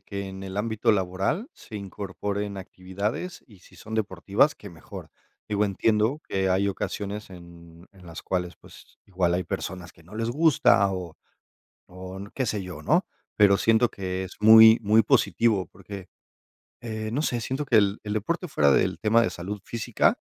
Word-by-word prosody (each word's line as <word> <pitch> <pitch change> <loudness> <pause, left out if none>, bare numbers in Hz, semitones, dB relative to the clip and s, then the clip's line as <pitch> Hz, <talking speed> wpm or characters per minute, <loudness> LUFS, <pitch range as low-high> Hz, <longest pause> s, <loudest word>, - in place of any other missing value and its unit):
que 100 0 -6
en 95 0 -8
el 95 0 -7
ámbito 110 0 +1
laboral 95 - -1
se 110 - -11
incorporen 100 +1 -5
actividades, 95 - -5
y 105 -5 -18
si - - -20
son 110 0 -8
deportivas, 100 - +1
¡qué 100 - -12
mejor! 80 -3 -11 0.4
Digo, 105 0 +1
entiendo 110 +7 +1
que 95 -1 0
hay 95 +2 +2
ocasiones 100 +2 -4
en 85 -1 -14
en 90 -2 -17
las 85 0 -9
cuales, 90 -1 -3
pues, - - -17
igual 90 -3 0
hay 90 -1 -1
personas 90 -2 -5
que - - -21
no 95 - -14
les 115 +1 -2
gusta 135 -9 +4
o 90 -4 -6 0.7
o 95 +1 -9 0.2
qué 130 - -1
sé 105 -2 -2
yo, 90 -5 -8
¿no? - - +2 0.3
Pero 100 -1 +5
siento 115 +1 +3
que 95 -1 -4
es 95 - -10
muy, 110 +1 +8
muy 110 +2 +4
positivo 105 - +2
porque, 100 0 -11 0.7
eh, 110 -2 -5
no 140 - 0
sé, 120 -6 -1
siento 135 +2 -3
que 120 - +3
el 100 -1 +3
el 105 - -3
deporte 170 - -2
fuera 70 - +3
del 95 +5 +1
tema 110 +2 +4
de 115 - +2
salud 100 +3 -6
física, 115 -2 0
100 Hz, 175 wpm, -25 LUFS, 95-110 Hz, 0.7 s, muy